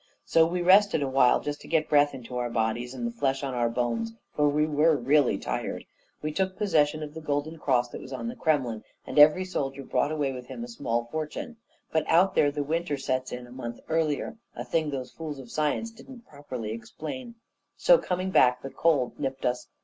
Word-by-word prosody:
So 165 0 +4
we 175 +1 -2
rested 190 -3 +5
awhile, 135 -2 +4
just 145 0 -4
to - - -12
get 160 -1 +2
the - - -29
breath 145 -1 +4
into 125 -1 -9
our 120 -1 -1
bodies 115 +2 -1
and 240 - -4
the 235 - -1
flesh 135 -12 -1
on 135 -2 -2
our 120 -1 +1
bones, 115 -1 -1 0.2
for 150 -1 +3
we 150 +1 +2
were 155 +1 +3
really 135 +1 +3
tired. - - -4 0.4
We 155 - -1
took 190 +3 -1
possession 155 -7 +2
of 150 -1 -7
the 160 - -7
golden 155 +2 -2
cross 125 -4 +1
that - - -8
was 130 - -10
on 135 - -4
the 235 - -4
Kremlin; 130 - 0 0.2
and - - 0
every 155 +5 +7
soldier 140 -6 -3
brought 145 - 0
away 145 -3 0
with 125 -1 -8
him 235 - -7
a - - -6
small 120 - -2
fortune. 155 +9 -5 0.3
But 160 -1 0
out 185 +4 +5
there 145 - +4
the 145 0 -2
winter 160 0 -1
sets 130 -1 -2
in 125 0 -6
a 120 - -15
month 120 -2 -6
earlier 160 +6 0 0.2
a - - -5
thing 160 -2 0
those 130 -3 -5
fools 155 -3 -6
of 125 -3 -11
science 155 +9 -1
didn't 240 +1 -13
properly 130 -7 -6
explain. 155 - -7 0.4
So, - - +6
coming 185 +1 -2
back, 125 -6 +4
the 135 - -6
cold 145 -7 +1
nipped 135 -2 -3
us. 125 0 -1
145 Hz, 215 wpm, -27 LUFS, 125-165 Hz, 0.4 s, every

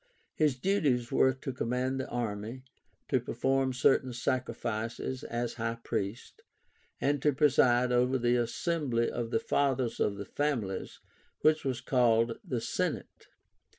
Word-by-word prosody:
His 150 -4 +2
duties 135 -8 +1
were 130 - +4
to 130 +1 -6
command 125 +2 -1
the 130 - -3
army, 115 +1 -4 0.4
to - - +2
perform 135 0 0
certain 130 0 +2
sacrifices 120 0 -2
(as 120 0 -3
high 115 +1 -1
priest), 105 - -4 0.6
and 145 0 +1
to 150 - +4
preside 125 -3 +4
over 125 +2 +3
the 120 0 +2
assembly 120 0 0
of 115 -1 -3
the - - +1
Fathers 135 - 0
of 100 -1 +1
the 100 - -5
families, 120 -11 -2 0.4
which 155 0 +3
was 130 -2 -2
called 115 -3 +2
the 125 - -2
SENATE, - - -3
i. - - -38
125 Hz, 140 wpm, -30 LUFS, 115-135 Hz, 0.6 s, were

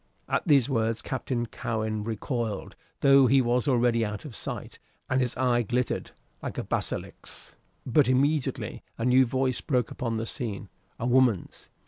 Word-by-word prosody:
At - - +1
these 140 -6 +5
words 115 -4 0
Captain 130 -2 -2
Cowen 110 -2 -3
recoiled, 115 -1 -3 0.3
though 135 -1 +7
he 135 +2 +5
was 125 +2 +1
already 120 -3 +3
out 105 +2 -4
of 130 -7 -8
sight, - - -6 0.3
and 130 0 +1
his 125 -1 -1
eye 125 -2 +2
glittered 120 +3 -1 0.3
like - - -5
a - - -1
basilisk's. - - -5 0.3
But 130 +1 +3
immediately 140 +2 0 0.2
a 115 - -2
new 125 +1 +5
voice 130 0 0
broke 125 -5 0
upon 115 -2 -3
the 110 +1 -2
scene, 105 -4 -5 0.3
a 115 - -2
woman's. 125 -6 +1
125 Hz, 155 wpm, -27 LUFS, 115-130 Hz, 0.3 s, though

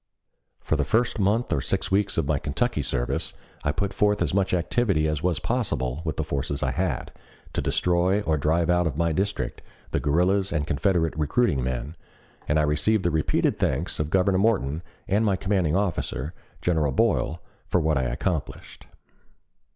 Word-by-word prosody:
For - - -1
the 75 - +1
first 115 +7 +1
month 105 +5 +1
or 70 - +1
six - - -2
weeks 100 +1 +1
of 80 - +2
my 70 0 +1
Kentucky - - -1
service - - -2 0.3
I 75 - +1
put 100 +7 -2
forth 105 0 +2
as - - -1
much 95 -1 +1
activity 90 -2 +1
as 75 -1 -1
was 90 -2 +1
possible 85 - -1
with 80 -4 -3
the - - 0
forces 70 +1 -2
I 65 - +1
had, - - -2 0.4
to - - 0
destroy 90 +3 +2
or 80 -6 +1
drive 80 +3 +1
out 90 -1 +3
of 70 -3 -3
my 85 0 +1
district 100 +5 -2 0.3
the - - +1
guerrillas 90 +6 +2
and 75 -3 0
Confederate 85 +1 +1
recruiting 75 - +1
men, 65 +5 -3 0.5
and 75 - +2
I 75 - +3
received 80 +8 +2
the 85 - +1
repeated 80 -1 +1
thanks 75 +7 -1
of 75 0 -1
Governor 95 +1 +3
Morton 90 -9 +1 0.3
and 105 +3 +2
my 100 -3 +2
commanding 95 -5 +1
officer, 85 -6 -1 0.3
General 80 -5 +2
Boyle, 80 +5 +1 0.3
for 90 - +2
what 80 -3 +1
I 65 - 0
accomplished. 80 +4 -4
85 Hz, 175 wpm, -25 LUFS, 75-95 Hz, 0.5 s, out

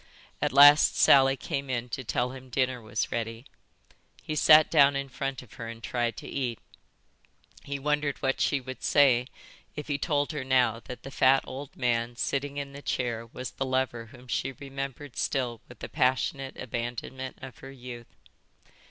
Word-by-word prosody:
At - - +1
last 145 +3 +8
Sally 135 0 +6
came 140 0 -4
in 120 -1 -2
to 130 - -4
tell 125 +1 -1
him 130 0 -11
dinner 130 0 0
was 110 -1 -3
ready. 115 +1 -4 0.8
He 155 - -4
sat 155 +1 +6
down 140 -3 +6
in 140 0 -3
front 135 0 -4
of 120 - -17
her 115 - -5
and 115 0 -9
tried 120 -1 -1
to - - -8
eat. 125 -4 -2 1.1
He 140 0 -4
wondered 150 0 0
what 135 0 -1
she 140 - +2
would 130 0 -8
say 130 -4 +4 0.5
if 150 - -6
he 140 -1 -1
told 145 -1 0
her 150 -4 -4
now 125 -4 +2
that 125 - -9
the 135 - -8
fat 135 +1 +4
old 135 +1 -8
man 120 -1 0
sitting 140 +3 -2
in 140 -1 -5
the 140 - -9
chair 120 -4 -2
was 125 +2 -7
the - - -3
lover 130 -3 -1
whom 130 +1 -15
she 135 +2 -2
remembered 135 0 -7
still 125 -5 -1
with - - -13
the - - -7
passionate 130 +1 0
abandonment 120 +2 -5
of 130 -3 -9
her 135 - -10
youth. 125 -3 -9
130 Hz, 180 wpm, -28 LUFS, 120-140 Hz, 1.1 s, last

